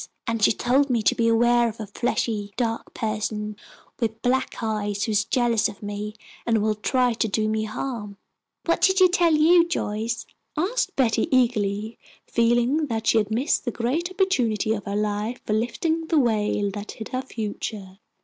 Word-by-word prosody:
And 230 -1 -2
she - - +6
told 265 +6 +2
me 235 -3 +1
to - - +4
beware 235 +1 +3
of 225 - -10
a 215 - -4
fleshy, 205 -1 -2
dark 230 -2 -2
person 215 -1 -3 0.4
with 225 -2 -2
black 260 +1 +1
eyes, 210 -2 -1
who 225 - -1
is 210 0 +2
jealous 235 -3 +2
of 205 0 -12
me 205 +1 -5 0.3
and 230 -1 +2
will 215 0 +1
try 245 +3 +1
to 225 0 0
do 215 +1 0
me 215 0 0
harm." 215 -3 -5 0.5
"What 335 0 +1
did 380 +2 +4
she 370 -1 +7
tell 345 -3 +3
you, 335 +3 +6
Joyce?" 225 -9 -2 0.3
asked 470 +10 0
Betty, 240 -5 +2
eagerly, 220 -4 +1 0.3
feeling 240 +6 +2
that 225 -3 -3
she 225 - +4
had 210 -1 -1
missed 240 +7 +1
the 245 - -1
great 255 +10 -1
opportunity 250 - +1
of 205 -4 -5
her 200 - -3
life 210 +3 -1
for 215 - -1
lifting 320 +9 -1
the 320 - +2
veil 210 -4 +1
that 205 0 -6
hid 220 - -8
her 255 - -2
future. 210 -5 -6
225 Hz, 180 wpm, -24 LUFS, 210-255 Hz, 0.5 s, she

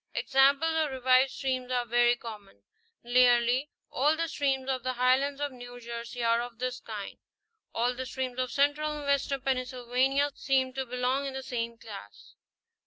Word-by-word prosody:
Examples 280 +4 +3
of 310 -2 +1
revived 260 0 +3
streams 255 -1 -3
are 245 -1 0
very 240 +1 +3
common; 215 -4 -11 0.4
nearly 245 +2 +3 0.2
all 295 +4 +2
the 330 0 -1
streams 270 -4 -1
of 260 -1 -1
the 255 +1 -2
Highlands 260 +3 +2
of 290 -1 -2
New 245 -1 -10
Jersey 235 +1 -6
are 230 0 +3
of 240 -1 -7
this 255 +1 -3
_kind; 210 -3 -7 0.6
all 240 +2 +1
the 260 +1 -5
streams 255 -1 -4
of 255 -1 -1
central 290 +2 +1
and 295 - -7
western 280 -1 0
Pennsylvania 255 +2 0
seem 265 -2 0
to 265 0 -4
belong 250 +3 -1
in 270 - -6
the 265 - -5
same 235 -2 -4
class. 200 - -11
255 Hz, 170 wpm, -29 LUFS, 245-270 Hz, 0.6 s, Examples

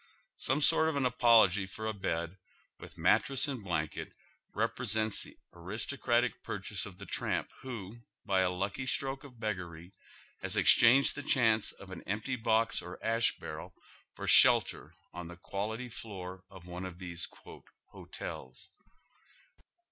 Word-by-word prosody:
Some 135 +4 +1
sort 160 +1 +5
of 160 - -3
an 140 - +1
apolc^y 115 -6 +4
for 110 +2 -7
a 110 - -1
bed, 85 -2 -3 0.4
with - - -12
mattress 135 +1 +2
and 130 -6 -4
blanket, 80 -5 -3 0.4
represents 110 0 0
the - - -11 0.2
aristocratic 120 +6 -1
purchase - - -3
of - - -12
the - - -9
tramp - - -1
who, 115 -5 -7 0.3
by 95 -3 +2
a 95 -1 +3
lucky 100 +8 -3
stroke 135 +1 -1
of 125 -5 -14
beggary, 90 -5 -5 0.5
has - - -2
exchanged 125 +4 +6
the 145 - -6
chance 115 -6 +3
of 95 -1 -13
an 95 - -7
empty 105 +7 -2
box 115 -1 +1
or 90 +1 -8
ash 115 +1 +2
barrel - - -8 0.4
for - - -6
shelter - - +5 0.2
on 90 -1 -7
the 85 0 -10
quality 110 +7 -4
floor 95 -5 -8
of 95 -3 -13
one 90 +1 -7
of 90 -2 -10
these 90 -2 -4 0.3
" - - -30
hotels." 65 0 -8
110 Hz, 150 wpm, -32 LUFS, 90-120 Hz, 0.5 s, exchanged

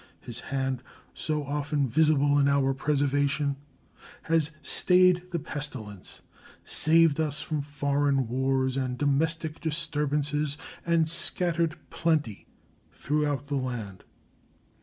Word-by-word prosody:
His 120 0 -6
hand, 135 -1 -2 0.3
so 150 -1 -2
often 145 0 -1
visible 145 +1 +3
in 140 - +4
our 140 -1 +2
preservation, 145 0 0 0.7
has 160 -2 +1
stayed 180 +3 +4
the 175 - -2
pestilence, 135 - -5 0.4
saved 160 -1 +3
us 150 -2 0
from 150 0 -2
foreign 140 -2 0
wars 130 +1 0
and 130 -2 -2
domestic 155 +3 0
disturbances, 150 -1 -1 0.3
and 165 -2 +3
scattered 165 0 +1
plenty 155 -10 -1 0.4
throughout 145 -2 -1
the 140 -1 -2
land. 115 -8 -5
145 Hz, 105 wpm, -27 LUFS, 135-155 Hz, 0.7 s, in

